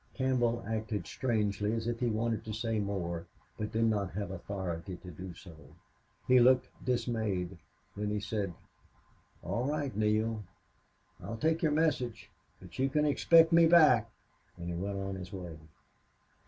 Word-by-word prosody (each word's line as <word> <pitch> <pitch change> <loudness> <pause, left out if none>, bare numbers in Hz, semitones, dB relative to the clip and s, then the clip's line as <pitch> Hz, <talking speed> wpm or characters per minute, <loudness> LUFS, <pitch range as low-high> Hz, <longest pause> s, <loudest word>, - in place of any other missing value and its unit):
Campbell 125 -3 +1
acted 110 -1 -2
strangely, 105 -4 0
as 115 -1 -2
if 120 0 -2
he 125 - +1
wanted 115 -1 -1
to 110 - -4
say 115 0 -1
more, 90 -5 -3 0.3
but 105 0 -4
did 115 +1 +1
not 100 -4 0
have 100 0 -3
authority 95 -1 -5
to 90 +1 -10
do 90 +2 -8
so. 85 -1 -12 0.7
He 130 0 +6
looked 125 +1 +5
dismayed. 110 -8 -1 0.4
Then 105 0 -2
he 105 0 -1
said: 100 -4 -3 0.9
"All 100 - -1
right, 145 -6 -2
Neale. 110 +1 +1 0.8
I'll 115 - -5
take 160 +5 +1
your 160 - +2
message. 150 -6 0 0.3
But 90 +5 -12
you 135 +1 +2
can 150 +2 +2
expect 165 +3 +5
me 165 0 +7
back." 150 -10 +6 0.5
And 85 0 -6
he - - -2
went 100 +3 -3
on 95 0 -3
his 90 -1 -7
way. 90 -5 -7
110 Hz, 155 wpm, -31 LUFS, 95-125 Hz, 0.9 s, me